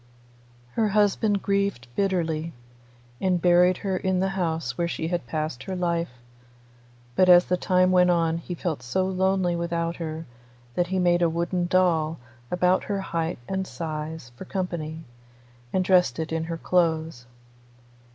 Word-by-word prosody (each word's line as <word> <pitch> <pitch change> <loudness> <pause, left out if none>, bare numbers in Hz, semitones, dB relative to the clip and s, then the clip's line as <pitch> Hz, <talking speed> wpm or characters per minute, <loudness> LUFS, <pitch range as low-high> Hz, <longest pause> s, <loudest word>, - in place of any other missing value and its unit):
Her 220 - +1
husband 205 0 +2
grieved 200 -11 0
bitterly, 165 -4 -1 0.7
and 185 -2 +2
buried 180 +1 +4
her 190 -1 0
in 190 0 0
the 190 +1 +1
house 165 -9 -2
where 170 - 0
she 160 -1 -3
had 175 -8 -2
passed 155 -2 -3
her 190 - -4
life; 170 -3 -1 1.1
but 185 -1 +4
as 180 0 +8
the 180 - +1
time 185 0 +2
went 180 -1 +5
on 165 -1 +2
he 175 +1 -6
felt 165 -6 -3
so 130 +10 0
lonely 190 -1 +1
without 170 0 -2
her 160 -1 -5 0.5
that 175 +5 0
he 190 +1 -1
made 175 -1 +3
a 170 - +4
wooden 175 +2 -1
doll 165 -3 +2 0.3
about 180 +1 +2
her 200 -1 -2
height 170 -3 -2
and 190 0 -2
size 155 -4 -5
for 130 - -9
company, 165 -4 -4 0.7
and 185 -1 +1
dressed 180 -9 +3
it 160 0 -3
in 160 0 -1
her 165 0 -4
clothes. 160 -7 0
175 Hz, 155 wpm, -25 LUFS, 160-185 Hz, 1.1 s, as